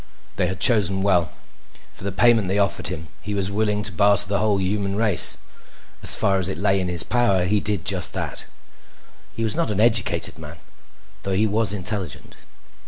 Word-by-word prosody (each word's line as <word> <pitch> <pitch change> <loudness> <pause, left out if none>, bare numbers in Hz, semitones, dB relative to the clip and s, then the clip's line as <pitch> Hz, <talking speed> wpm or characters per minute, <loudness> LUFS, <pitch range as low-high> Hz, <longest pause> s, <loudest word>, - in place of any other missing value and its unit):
They 90 -2 0
had 95 - -5
chosen 95 -5 +2
well. 90 -6 +1 0.6
For - - -13
the 100 - -3
payment 115 0 +2
they 95 +2 -1
offered 100 -1 -1
him 80 -4 -7
he 105 - -5
was 100 -1 -1
willing 105 0 -1
to 100 - +1
barter 100 +3 +3
the 100 0 -1
whole 105 -2 0
human 100 +1 -2
race. 105 -4 +3 0.6
As - - +8
far 95 -1 0
as 95 0 +2
it 80 - -5
lay 95 +1 +1
in 90 - -3
his 90 -1 0
power 100 -7 +1
he 105 +3 +1
did 100 -4 -3
just 95 -3 -2
that. - - -4 0.9
He 115 - -4
was 110 -2 0
not - - -1
an 105 -1 -3
educated 110 -8 +1
man, 80 +1 -10 0.6
though 95 - -4
he 105 +3 +2
was 110 0 +3
intelligent. 100 -1 -5
100 Hz, 190 wpm, -21 LUFS, 95-105 Hz, 0.9 s, As